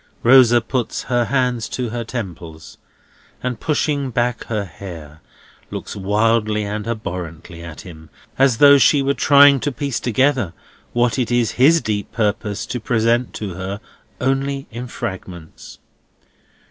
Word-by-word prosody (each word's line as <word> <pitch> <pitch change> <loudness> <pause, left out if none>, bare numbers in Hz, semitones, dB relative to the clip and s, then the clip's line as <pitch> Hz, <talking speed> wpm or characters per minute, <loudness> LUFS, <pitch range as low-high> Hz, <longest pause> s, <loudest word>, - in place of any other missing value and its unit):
Rosa 120 -1 +6
puts 120 0 -3
her 120 -1 0
hands 125 -2 0
to 125 -2 -3
her 120 +1 -4
temples, 85 -9 -8 0.6
and, 125 -3 -3
pushing 145 -3 -1
back 120 0 -1
her 105 -3 -2
hair, 80 -4 -10 0.5
looks - - -7
wildly 105 +2 +1
and 105 +1 -4
abhorrently 90 -6 -6
at 85 -2 -9
him, 80 -4 -13 0.3
as 135 -3 +3
though 140 +1 +7
she 140 0 +4
were 140 +1 +1
trying 140 -1 +6
to 145 - -2
piece 130 0 -3
together 125 - +1 0.4
what 120 +1 +1
it 125 - 0
is 120 -2 +2
his 155 +6 +4
deep 105 -2 -3
purpose 105 -1 -2
to 125 - -4
present 115 +2 +1
to 100 -4 -5
her 95 +3 -5 0.4
only 135 +1 -1
in 120 +2 -6
fragments. 95 -8 -8
115 Hz, 140 wpm, -19 LUFS, 100-130 Hz, 0.6 s, though